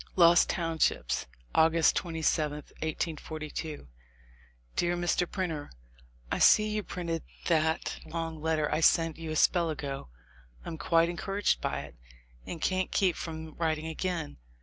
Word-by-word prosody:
Lost 170 -1 +6
Townships, 165 - 0 0.3
August 160 0 +4
27, 160 -3 0 0.3
1842. 155 - -4 0.9
Dear 175 0 +1
Mr. 175 0 +1
Printer, 165 -6 -3 0.6
I - - 0
see 215 - +6
you 210 0 -1
printed 170 -4 -4 0.2
that 160 -1 +1
long 165 -1 -4
letter 155 -1 +1
I - - +2
sent 165 -1 +3
you 165 -1 -5
a 155 - -2
spell 170 +1 +3
ago. 140 - -5 0.6
I'm 160 - -6
quite 165 0 +3
encouraged 195 +4 0
by - - -1
it, - - -11 0.5
and 170 - -5
can't 185 +3 0
keep 185 -4 +2
from 160 -1 -6
writing 160 -2 0
again. 160 - -3
165 Hz, 130 wpm, -30 LUFS, 155-175 Hz, 0.9 s, Lost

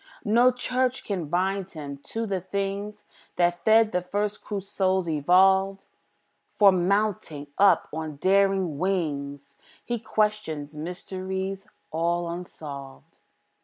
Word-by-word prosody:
No 235 +4 +5
church 250 +1 -1
can 185 -6 -3
bind 190 +3 0
him 145 -4 -7
to 225 0 -3
the 195 -3 -2
things 200 +2 -4 0.3
That 175 0 +1
fed 220 0 +5
the 180 - 0
first 205 +3 -2
crude 200 -2 -4
souls, 190 -2 0
evolved; 190 +5 +3 0.7
For, 200 -2 +7
mounting 185 -5 0
up 200 0 +5
on 155 -1 -4
daring 190 -2 +2
wings, 145 -7 -2 0.3
He 240 -1 -2
questions 210 -10 -1
mysteries 190 +4 -5 0.2
all 170 +2 0
unsolved. 145 -6 -9
190 Hz, 115 wpm, -26 LUFS, 165-200 Hz, 0.7 s, For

